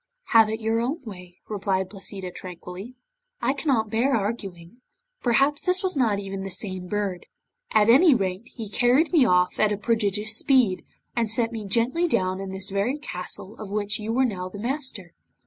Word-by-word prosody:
'Have 225 -2 +6
it 220 0 -2
your 225 0 0
own 255 +7 -1
way,' 180 -5 -10
replied 195 -2 -1
Placida, 195 -1 -6
tranquilly. 180 +6 -8 0.4
'I 265 - +1
cannot 265 -7 0
bear 240 +4 +2
arguing. 200 -2 -4 0.4
Perhaps, 275 +4 +2
this 365 +2 +2
was 375 -2 +1
not 230 -7 +2
even 195 -1 -5
the 195 - -5
same 185 -1 -2
bird. 200 -2 -3 0.4
At 215 -1 +4
any 275 +5 +7
rate, 195 0 -2
he 225 -3 -7
carried 245 +9 +3
me 300 -7 +6
off 180 -3 +2
at 215 -1 +4
a 205 - 0
prodigious 215 -1 0
speed, 240 -7 +3 0.3
and 230 -2 +1
set 230 +1 +1
me 220 -3 -5
gently 245 - +1
down 185 - 0
in 195 0 -5
this 190 +1 -5
very 205 +8 0
castle 190 -6 -6
of 215 -2 -7
which 205 0 -2
you 220 +3 -2
are 260 - +4
now 185 -6 -3
the 205 - -9
master. 235 - -3
215 Hz, 180 wpm, -25 LUFS, 195-245 Hz, 0.4 s, any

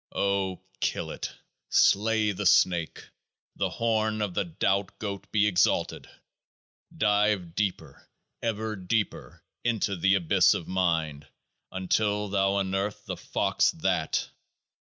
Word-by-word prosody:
O 100 -2 0 0.2
kill - - -2
it! - - -5 0.4
Slay 110 +1 +3
the 95 - -1
snake! 85 -3 +2 0.4
The - - -1
horn 110 -2 0
of 100 -3 -3
the - - 0
Doubt 95 +3 -1
Goat 100 -2 -6
be 105 -1 +3
exalted! 100 -4 +1 0.9
Dive 105 -4 +2
deeper, 100 0 -3 0.3
ever 110 -1 -2
deeper, 100 +2 -3 0.2
into 110 -4 0
the 95 +2 +3
Abyss 85 -4 +4
of 85 - -5
Mind, 80 -6 -1 0.4
until 105 +2 0
thou 95 0 +1
unearth 100 +1 -2
the - - -4
fox - - +1
THAT. - - -1
100 Hz, 115 wpm, -27 LUFS, 95-105 Hz, 0.9 s, Abyss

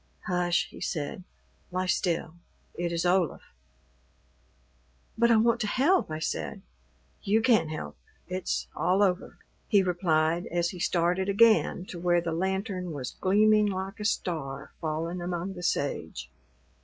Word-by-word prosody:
"Hush," 180 -2 +1
he - - -12
said; 155 +2 -3 0.5
"lie 185 +1 -1
still. 170 -3 0 0.4
It 175 0 -2
is 170 +1 -1
Olaf." 175 -3 +1 1.7
"But 235 +1 +3
I 230 - +6
want 230 +1 +3
to 215 - 0
help," 290 - +2
I 155 - -3
said. 160 - -4 0.6
"You 210 +3 +2
can't 225 -8 +3
help. 155 - -6 0.3
It's 185 0 -2
all 185 +4 +2
over," 185 -1 0 0.3
he 200 -2 +4
replied 170 -2 +1
as 175 0 0
he 180 - -9
started 180 +2 +1
again 215 -3 +4
to 175 - -8
where 175 0 +3
the 170 -1 -3
lantern 190 0 -2
was 135 -4 -5
gleaming 210 +2 +4
like 190 0 -4
a 210 - -4
star 160 -10 -2
fallen 165 +2 -2
among 175 +2 -3
the 180 - -8
sage. 80 - -2
180 Hz, 145 wpm, -28 LUFS, 170-195 Hz, 1.7 s, I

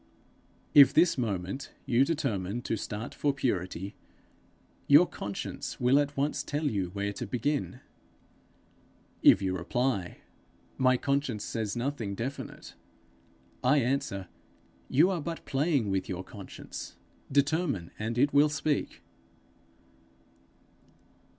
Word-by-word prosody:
If 140 -2 +8
this 175 - +5
moment 100 0 -3
you 130 -1 +4
determine 120 - -2
to - - -1
start 105 +2 -5
for 145 - +1
purity, 95 -7 -2 0.9
your 145 +5 +8
conscience 100 - -6
will 125 +3 +4
at 145 -1 -1
once 140 0 0
tell 145 +2 -3
you 100 -9 -1
where 100 +2 -3
to - - -5
begin. 130 +1 -2 1.4
If 95 - +6
you 95 -1 0
reply, 100 +1 -1 0.6
'My 130 -1 +4
conscience 140 -6 -1
says 110 -1 -3
nothing 120 -5 -2
definite'; 130 +7 -6 0.9
I 130 +4 +4
answer, 125 -8 -1 0.6
'You 165 +8 +4
are 175 -4 -2
but 165 +2 -5
playing 140 - +1
with 95 -1 -1
your 90 0 -4
conscience. - - -9 0.4
Determine, 140 - +1
and 110 +2 -3
it 145 +3 +3
will 145 +1 +6
speak.' 150 0 -2
125 Hz, 115 wpm, -29 LUFS, 100-145 Hz, 1.4 s, If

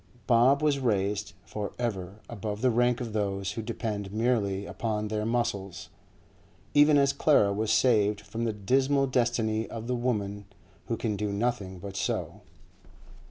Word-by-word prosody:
Bob 125 +6 +4
was 145 -2 +2
raised 105 -3 0
for 105 -1 -5
ever 105 -4 -4
above 105 -2 -5
the 130 -1 +3
rank 120 +1 +2
of 115 -4 -5
those 100 -2 -1
who 115 - -4
depend 105 -3 -4
merely 105 -3 0
upon 105 -1 -3
their 105 0 -1
muscles, 105 -6 -2 0.8
even 145 0 +6
as 140 -1 +3
Clara 140 -8 +4
was 110 +2 -1
saved 105 -5 +3
from 110 +3 -5
the 115 - +1
dismal 135 +7 +2
destiny 115 -3 0
of 115 -1 -6
the 125 +1 -1
women 105 -5 -2 0.4
who 115 - -1
can 110 -3 -1
do 105 0 -2
nothing 100 -3 -2
but 100 +2 -8
sew. 100 - -2
110 Hz, 155 wpm, -28 LUFS, 100-120 Hz, 0.8 s, even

